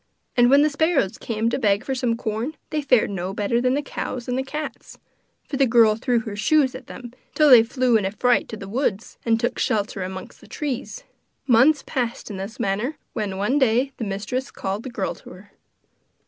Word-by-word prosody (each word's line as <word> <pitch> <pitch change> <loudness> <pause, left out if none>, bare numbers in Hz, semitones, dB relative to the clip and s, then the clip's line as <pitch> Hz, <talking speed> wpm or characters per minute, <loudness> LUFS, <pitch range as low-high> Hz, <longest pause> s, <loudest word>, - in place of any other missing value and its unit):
And 245 -1 +5
when 280 +2 +6
the 305 - +3
sparrows 285 - +1
came 230 0 -1
to - - -1
beg 205 -4 +2
for 270 - -2
some 245 -3 0
corn, 225 +8 -3 0.2
they 305 -1 0
fared 255 -7 +3
no 190 0 -4
better 225 +4 0
than 255 +1 +2
the 290 - -1
cows 255 -2 -5
and 250 - -1
the 260 - 0
cats, 300 +3 -7 0.5
for 275 - -3
the 270 -1 +4
girl 225 -2 +5
threw 240 0 0
her 215 -2 -6
shoes 265 +5 +2
at 255 0 -10
them, 240 -2 -9 0.2
till 300 -2 +5
they 245 -3 +10
flew 245 0 +2
in 205 - -2
a - - +1
fright 245 +4 +1
to 220 - -6
the 195 - -8
woods, 225 -2 -2
and 225 0 +3
took 240 - -1
shelter 205 -2 -1
amongst 185 0 -7
the - - -16
trees. 300 - -5 0.4
Months 270 +4 +4
passed 240 -3 -3
in 200 - -6
this 200 +6 -7
manner, 230 +7 -1 0.2
when, 205 -4 -3
one 240 +9 +1
day, 260 +1 +2
the - - -4
mistress 220 +6 -3
called 195 +2 -4
the 260 - -7
girl 205 -6 -3
to - - -14
her. 185 +3 -14
235 Hz, 215 wpm, -23 LUFS, 210-265 Hz, 0.5 s, they